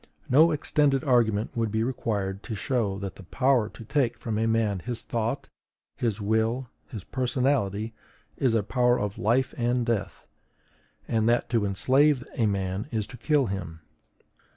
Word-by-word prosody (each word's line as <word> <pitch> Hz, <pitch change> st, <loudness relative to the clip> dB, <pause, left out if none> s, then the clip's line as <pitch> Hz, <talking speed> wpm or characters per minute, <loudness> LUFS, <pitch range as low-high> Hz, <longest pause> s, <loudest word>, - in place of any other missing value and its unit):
No 155 Hz, +6 st, +6 dB
extended 145 Hz, -3 st, +1 dB
argument 115 Hz, -5 st, +2 dB
would 115 Hz, -2 st, 0 dB
be 110 Hz, +1 st, +1 dB
required 105 Hz, -6 st, -2 dB
to 110 Hz, -, -4 dB
show 105 Hz, -2 st, -1 dB
that 100 Hz, -1 st, -6 dB
the 100 Hz, -, -11 dB
power 125 Hz, +3 st, +2 dB
to 115 Hz, -, -12 dB
take 120 Hz, -1 st, 0 dB
from 110 Hz, -3 st, -3 dB
a 115 Hz, -, +1 dB
man 110 Hz, -3 st, +1 dB
his 120 Hz, +4 st, -5 dB
thought, 115 Hz, +3 st, -2 dB, 0.5 s
his 115 Hz, -3 st, -1 dB
will, 110 Hz, +4 st, 0 dB, 0.2 s
his 105 Hz, -5 st, -7 dB
personality, 120 Hz, -5 st, 0 dB, 0.4 s
is 125 Hz, -4 st, +1 dB
a 110 Hz, -, +2 dB
power 125 Hz, +3 st, +2 dB
of 105 Hz, -1 st, -3 dB
life 120 Hz, +7 st, +1 dB
and 120 Hz, 0 st, +1 dB
death; 115 Hz, -4 st, -2 dB, 0.8 s
and 110 Hz, 0 st, +1 dB
that 120 Hz, 0 st, +1 dB
to 115 Hz, -4 st, +2 dB
enslave 130 Hz, +7 st, +3 dB
a 115 Hz, -6 st, +1 dB
man 95 Hz, +2 st, -2 dB
is 110 Hz, -5 st, -1 dB
to -, -, -11 dB
kill 150 Hz, -2 st, +2 dB
him. 90 Hz, -6 st, -5 dB
115 Hz, 160 wpm, -27 LUFS, 105-125 Hz, 0.8 s, No